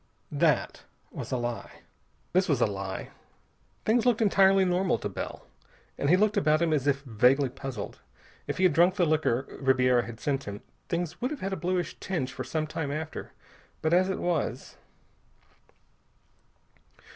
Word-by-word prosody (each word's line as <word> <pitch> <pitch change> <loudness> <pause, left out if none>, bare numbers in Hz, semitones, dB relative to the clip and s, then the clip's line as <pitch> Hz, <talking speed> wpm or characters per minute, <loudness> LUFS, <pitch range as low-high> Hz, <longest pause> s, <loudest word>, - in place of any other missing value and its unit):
That - - +1 0.3
was - - -7
a 130 - +1
lie. 120 -1 -5 2.0
Things 225 +2 +3
looked 245 -3 +3
entirely 195 -3 +5
normal 180 -4 +1
to - - -4
Bell. - - -6 0.5
But 140 - -1
he 180 - +6
looked 210 +1 +2
about 155 -5 +3
him 165 -2 +2
as 145 -2 0
if 140 -1 +1
vaguely 130 +3 +3
puzzled. 135 0 -6 0.5
If - - -3
he 185 - 0
had 180 -4 +5
drunk 175 +4 +4
the 180 -4 +3
liquor 150 -5 +1 0.2
Ribiera 125 -2 +3
had 115 -1 -9
sent 140 -1 -1
him, 100 0 -7 0.3
things 170 -1 -3
would 250 - 0
have 300 -2 -6
had 195 +1 -2
a - - 0
bluish 180 -1 -2
tinge 150 -9 -3
for 130 - -5
some 155 +5 -2
time 155 -1 -4
after. 155 +2 -5 0.5
But 160 +1 +2
as 185 +2 +4
it 190 - -1
was.... 155 -8 -2
155 Hz, 155 wpm, -28 LUFS, 135-185 Hz, 2.0 s, he